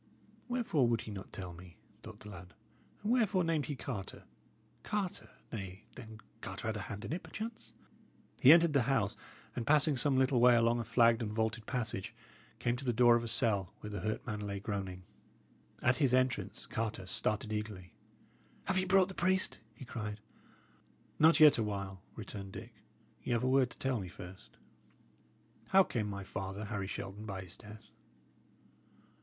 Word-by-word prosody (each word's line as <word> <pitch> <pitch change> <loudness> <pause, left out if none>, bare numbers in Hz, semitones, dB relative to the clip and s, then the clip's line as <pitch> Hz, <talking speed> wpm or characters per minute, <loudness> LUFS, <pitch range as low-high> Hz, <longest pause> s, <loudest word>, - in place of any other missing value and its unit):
"Wherefore 225 - +1
would 115 -1 +1
he 110 - -8
not 100 -1 -8
tell 90 -3 -6
me?" 85 0 -13 0.2
thought 110 -2 -11
the 105 - -9
lad. 90 -1 -11 0.5
"And 210 - 0
wherefore 215 -7 +3
named 165 -3 0
he 145 - -3
Carter? 115 -7 -6 0.6
Carter 180 - -3 0.2
nay, 95 -2 -6
then 110 -3 -10 0.2
Carter 110 - -4
had 110 - -2
a - - -3
hand 105 +1 -6
in 140 - -3
it, 180 - -3
perchance." 220 - -7 0.7
He 130 - +10
entered 165 -1 +7
the 140 - +4
house, 110 -7 +1 0.4
and 120 - -3
passing 150 0 +5
some 135 +1 +2
little 130 -1 +3
way 125 0 +7
along 115 0 +3
a - - -1
flagged 115 +1 +4
and 105 -2 -2
vaulted 110 0 -1
passage, 110 -7 -3 0.4
came 120 0 0
to 135 - -7
the 125 - +1
door 120 +1 +6
of 120 - +2
the 115 - -4
cell 105 -6 +1
where 105 - -6
the 105 - -3
hurt 110 0 -3
man 105 -2 -3
lay 100 -1 -4
groaning. 95 -3 -4 0.8
At 125 +1 +4
his 130 -4 +3
entrance 130 -1 0
Carter 110 -4 -3
started 105 +3 -1
eagerly. 105 -4 -5 0.7
"Have 190 -1 +1
ye 185 - 0
brought 190 0 +5
the 190 - -8
priest?" 185 +1 +1 0.2
he 130 - -10
cried. 105 -3 -5 1.0
"Not 160 +1 +6
yet 150 -5 +8
awhile," 100 -3 -3
returned 100 -3 -7
Dick. - - -9 0.5
"Y' - - -1
'ave 120 +1 +1
a - - +2
word 130 -2 +4
to - - -12
tell 130 -3 0
me 95 - -5
first. 90 +1 -12 1.1
How 195 0 +6
came 110 - -2
my 100 -1 -5
father, 95 +2 -5
Harry 105 -3 -3
Shelton, 100 +3 -6
by 95 -2 -4
his 90 -1 -9
death?" 105 -1 -13
115 Hz, 180 wpm, -33 LUFS, 100-135 Hz, 1.1 s, He